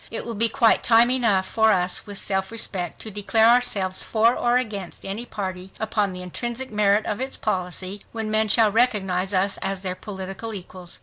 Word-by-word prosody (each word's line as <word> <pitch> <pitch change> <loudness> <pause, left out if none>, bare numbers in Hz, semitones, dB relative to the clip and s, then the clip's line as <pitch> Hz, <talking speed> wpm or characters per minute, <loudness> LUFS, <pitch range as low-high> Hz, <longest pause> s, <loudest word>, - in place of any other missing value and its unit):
It 225 - -4
will 235 - -5
be 230 +2 +2
quite 230 -2 +3
time 235 +1 +5
enough 225 -7 +2
for 220 +2 +2
us, 180 +1 -1
with 205 -1 -6
self 190 0 -2
respect, 185 -6 -2
to 220 - -5
declare 220 +2 +2
ourselves 215 -6 +3
for 225 +1 +3
or 240 +1 +2
against 205 -7 -5
any 210 +5 -5
party 190 -3 -6
upon 210 -2 -1
the 180 0 -7
intrinsic 240 +7 -4
merit 210 0 +2
of 210 +4 -3
its 265 +1 -3
policy, 185 +2 -3
when 220 -1 -4
men 215 0 +2
shall 215 0 +4
recognize 195 -5 +1
us 195 +1 +1
as 195 -1 -3
their 185 -1 -2
political 195 +3 -7
equals 180 -2 -3
205 Hz, 190 wpm, -23 LUFS, 190-225 Hz, -, time